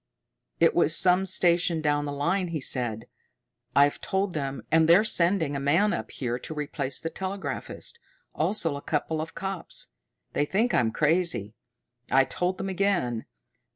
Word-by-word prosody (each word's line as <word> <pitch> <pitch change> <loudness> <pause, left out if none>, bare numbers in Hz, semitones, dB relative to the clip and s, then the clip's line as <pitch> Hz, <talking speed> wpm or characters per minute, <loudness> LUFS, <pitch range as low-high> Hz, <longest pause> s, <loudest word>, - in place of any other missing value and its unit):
"It - - +5
was 160 - +3
some 185 +2 +4
station 175 -2 +3
down 145 -1 0
the 145 - -3
line," 170 +7 0
he 165 -2 -3
said. 120 -4 -3 0.7
"I've 145 +1 +4
told 190 -1 -1
them, 140 -3 -4
and 160 0 +4
they're 180 +5 +7
sending 170 -7 +2
a - - -1
man 165 +10 +2
up - - -4
here 120 -2 -3
to 155 - -7
replace 140 -2 -3
the 165 - -4
telegraphist, 195 - -4 0.3
also 165 -8 0
a 140 - -6
couple 155 +1 -2
of 160 - -7
cops. 190 -2 -4 0.4
They 145 - +1
think 220 +10 0
I'm 115 -2 +3
crazy. 150 - +1 0.6
I 135 0 +5
told 180 +6 -2
them 195 - -4
again. 180 - 0
160 Hz, 155 wpm, -26 LUFS, 140-185 Hz, 0.7 s, they're